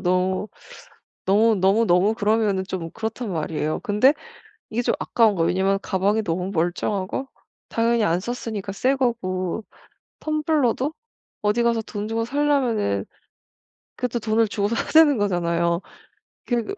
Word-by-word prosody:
너무, 185 +1 +1 0.8
너무, 220 +4 +4
너무, 195 +5 +4
너무 180 +4 +4
그러면은 210 -3 +1
좀 185 -3 -5
그렇단 225 +2 -4
말이에요. 155 -1 -2
근데 210 +7 +4 0.6
이게 235 +2 0
좀 - - +1
아까운 225 -4 +3
거예요. 165 -2 +1
왜냐면 190 +3 +2
가방이 200 +3 +1
너무 180 +1 -2
멀쩡하고 185 +7 -1 0.4
당연히 230 0 +2
안 170 -3 +2
썼으니까 220 -2 -4
새 255 +7 +1
거고, 220 -7 -1 0.6
텀블러도 305 -3 0 0.5
어디 210 +3 +2
가서 235 -1 +1
돈 210 -1 -5
주고 225 +1 -1
사려면은 245 - +1 0.9
그것도 245 -1 -2
돈을 220 +1 +2
주고 205 -1 -1
사야 230 - -1
되는 305 -6 +6
거잖아요. 170 -3 +1 0.7
그 240 -2 0
210 Hz, 305 characters per minute, -23 LUFS, 185-235 Hz, 0.9 s, 되는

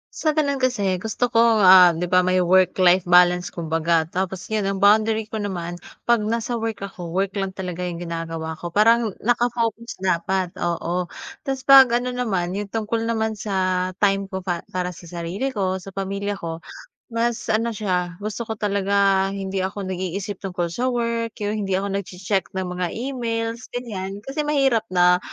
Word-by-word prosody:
Sa 310 -2 0
gano'n 285 -3 +1
kasi 205 -8 0
gusto 225 +4 -2
ko, 230 - +3
ah, 190 -6 +7
'di 165 - -3
ba, 180 - +6
may 185 0 +2
work-life 185 0 +4
balance 180 0 +5
kumbaga. 165 0 0
Tapos 185 0 -3
'yon 210 -2 0
ang 195 - -1
boundary 220 +2 +4
ko 215 0 -6
naman, 175 -4 -4 0.2
'pag 235 -1 +3
nasa 230 +2 -2
work 225 -2 -4
ako, 180 -4 -7
work 195 +1 +1
lang 195 -1 -3
talaga 180 -1 -4
'yong 175 - -4
ginagawa 165 -1 -5
ko. 175 - -5
Parang 225 0 +4
naka-focus 235 -3 -1
dapat, 185 0 0
oo. 175 +1 -1 0.4
Tapos 265 -1 -2
'pag 265 -3 +8
ano 250 - -2
naman, 195 -8 -1
'yon 205 +1 -3
tungkol 225 +2 -2
naman 220 -2 -1
sa 185 -3 0 0.2
time 195 -1 +2
ko 190 -1 -5
pa 175 -2 -2
para 180 0 -3
sa 175 0 -13
sarili 175 +8 -3
ko, 190 -7 -1
sa 190 +1 -12
pamilya 200 +1 -2
ko, 165 -3 -6 0.5
mas 230 0 -1
ano 225 +1 0
siya, 180 -4 -1
gusto 215 +1 -4
ko 220 - -3
talaga 200 -1 +2
hindi 195 -1 -3
ako 190 +2 -3
nag-iisip 190 +2 -4
tungkol 180 -3 -3
sa 240 +9 -2
work, 230 -2 -1
'yong 205 0 -2
hindi 190 - -1
ako 195 +1 -1
nagche-check 190 +1 -2
ng 190 -1 -1
mga 180 - 0
emails, 230 -2 -3
ganiyan. 200 -5 -5
Kasi 295 +3 -3
mahirap 270 -7 +2
na, 180 0 +4
195 Hz, 175 wpm, -22 LUFS, 180-225 Hz, 0.5 s, pag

